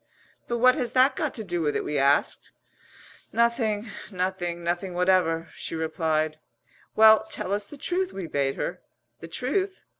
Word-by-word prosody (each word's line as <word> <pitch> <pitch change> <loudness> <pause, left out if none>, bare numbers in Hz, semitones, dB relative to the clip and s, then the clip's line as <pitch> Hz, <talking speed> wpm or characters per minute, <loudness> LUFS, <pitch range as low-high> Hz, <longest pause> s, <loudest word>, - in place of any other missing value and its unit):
"But 240 - -1
what 255 +2 +6
has 245 -1 -3
that 260 +2 +4
got 300 - -2
to 220 - -4
do 175 -4 -2
with 150 -2 0
it?" - - 0
we 150 -1 -1
asked. 140 +1 +1 0.8
"Nothing 230 -2 +1 0.2
nothing 180 -2 -3
nothing 175 +2 -2
whatever," 175 -2 +2
she - - -6
replied. 155 -1 -1 0.6
"Well, 220 0 +7
tell 190 - -2
us 205 0 -2
the 290 - -11
truth," 365 +6 -1
we 190 - -6
bade 140 -3 -1
her. - - -4 0.4
"The 165 - -9
truth? 375 - -2
185 Hz, 160 wpm, -26 LUFS, 165-235 Hz, 0.8 s, Well